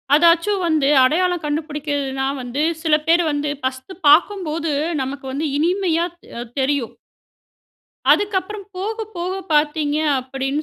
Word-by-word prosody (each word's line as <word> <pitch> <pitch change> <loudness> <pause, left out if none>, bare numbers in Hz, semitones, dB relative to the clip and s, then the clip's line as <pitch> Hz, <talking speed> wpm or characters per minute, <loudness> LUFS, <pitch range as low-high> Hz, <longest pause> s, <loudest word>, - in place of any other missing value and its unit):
அதாச்சும் 340 +5 +3
வந்து 310 -4 +2 0.2
அடையாளம் 350 +5 +1
கண்டுபுடிக்கிறதுன்னா 290 -3 -2 0.2
வந்து, 250 +4 -3 0.2
சில 310 -2 +4
பேர் 340 +1 +4
வந்து 290 0 -1
ஃபர்ஸ்ட் 260 +7 -4
பார்க்கும்போது, 330 -1 +3 0.3
நமக்கு 270 +1 -5
வந்து 295 +4 -2
இனிமையா 345 0 +1 0.3
அ - - -4 0.2
தெரியும். 265 -3 -1 1.2
அதுக்கப்பறம், 405 0 -1
போக 420 +4 -3 0.2
போக 360 +2 -2 0.2
பாத்தீங்க, 295 0 +1 0.2
அப்படினு 270 +3 -3
305 Hz, 115 wpm, -20 LUFS, 280-355 Hz, 1.2 s, சில